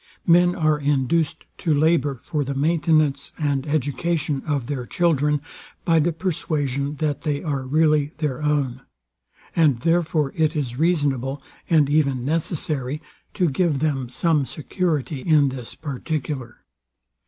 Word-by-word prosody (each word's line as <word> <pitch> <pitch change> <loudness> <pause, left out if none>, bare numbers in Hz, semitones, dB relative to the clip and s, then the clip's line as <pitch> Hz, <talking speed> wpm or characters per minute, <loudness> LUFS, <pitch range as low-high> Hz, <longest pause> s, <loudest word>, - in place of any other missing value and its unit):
Men 175 +1 +5
are 155 -3 +2
induced 145 +2 0 0.2
to 165 - 0
labour 145 -3 +2
for 150 -4 -1
the 140 0 -4
maintenance 150 -1 +1
and 145 -2 -1
education 145 0 -1
of 145 -5 0
their 130 -1 -3
children, 150 -3 +1 0.4
by 165 -1 +4
the 165 +3 +2
persuasion 150 -5 -2
that 145 -1 -1
they 150 -1 -2
are 145 -5 -1
really 150 0 +3
their 150 -3 -2
own; 140 -4 0 0.7
and 145 -8 +3
therefore 165 -3 +1
it 160 0 +1
is 130 -4 -3
reasonable, 145 -5 0 0.3
and 155 -4 +4
even 140 -4 +1
necessary, 150 -3 -1 0.4
to 180 -3 +2
give 155 0 +1
them 135 -4 -1
some 155 +3 +1
security 155 -1 -2
in 150 -2 +4
this 130 -3 -8
particular. 140 -3 -5
150 Hz, 130 wpm, -23 LUFS, 135-160 Hz, 0.7 s, Men